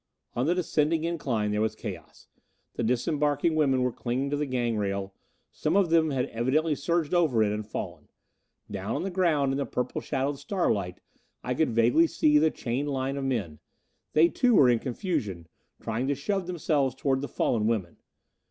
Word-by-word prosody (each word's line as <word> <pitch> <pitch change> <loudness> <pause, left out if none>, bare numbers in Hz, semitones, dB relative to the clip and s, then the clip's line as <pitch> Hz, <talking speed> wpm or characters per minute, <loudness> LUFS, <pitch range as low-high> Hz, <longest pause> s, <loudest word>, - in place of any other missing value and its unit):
On 125 +4 0
the 175 - +2
descending 160 -2 +1
incline 130 -11 -1
there 105 0 0
was 110 0 0
chaos. - - -9 0.5
The - - -4
disembarking 145 +6 +1
women 135 -5 +2
were 125 - +1
clinging 130 +4 -2
to - - +1
the 145 0 -1
gang 120 -3 -1
rail; 100 -1 -2 0.4
some 155 +4 -1
of 190 -5 +2
them 160 -1 +4
had 130 -3 0
evidently 140 +7 +1
surged 165 +2 -1
over 155 -11 +3
it 105 - +1
and 105 +1 -3
fallen. 105 - -7 0.6
Down 100 +2 -3
on - - -2
the 195 - -3
ground 160 -7 +2
in 135 - -1
the 140 - 0
purple 125 0 -3
shadowed 135 +1 -2
starlight 125 - -1 0.4
I 125 - -1
could 155 +5 +1
vaguely 120 +8 +4
see 150 -1 +3
the 160 +1 +4
chained 135 +1 -3
line 135 0 -2
of 140 -1 -3
men. 105 - -2 0.5
They 160 +2 +6
too 245 +6 +2
were 130 - +6
in 120 - +2
confusion, 110 - -3 0.3
trying 115 +3 -2
to 140 - +1
shove 185 +6 -2
themselves 150 -7 0
toward 135 0 0
the 145 - -3
fallen 110 -2 0
women. 105 -7 -1
135 Hz, 185 wpm, -27 LUFS, 115-155 Hz, 0.6 s, They